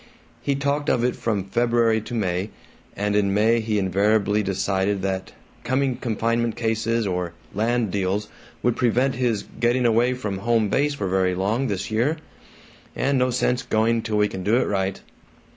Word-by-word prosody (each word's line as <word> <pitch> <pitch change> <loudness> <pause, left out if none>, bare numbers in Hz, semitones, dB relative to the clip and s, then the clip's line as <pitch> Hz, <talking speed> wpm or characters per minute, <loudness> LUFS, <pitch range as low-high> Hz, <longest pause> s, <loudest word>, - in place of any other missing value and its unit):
He 140 - 0
talked 145 +1 -1
of 120 - +2
it 125 - +1
from 110 -4 -1
February 115 +2 +2
to 120 - -6
May, 95 -2 -1 0.5
and 105 0 -1
in 100 -1 +2
May 110 +3 +3
he 110 -1 -1
invariably 105 +2 +2
decided 95 0 -1
that 95 -1 -3 0.3
coming 130 +1 0
confinement 115 0 -1
cases 115 0 0
or 90 -2 -2 0.2
land 115 0 0
deals 100 +2 -1 0.4
would 120 -1 +2
prevent 125 +2 +2
his 120 -4 0 0.2
"getting 120 +1 +2
away 120 +2 +3
from 105 -6 -4
home 115 -1 +1
base 145 +4 +1
for 100 - -3
very 95 0 +1
long 110 +8 0
THIS 100 -1 -3
year 125 +9 +1 0.8
and 135 0 +1
no 125 0 +2
sense 125 0 +1
going 115 +1 +1
till 110 -1 -2
we 105 0 +3
can 95 - -6
do 105 +4 +2
it 130 - +2
right." 95 -1 -1
110 Hz, 170 wpm, -23 LUFS, 100-120 Hz, 0.8 s, May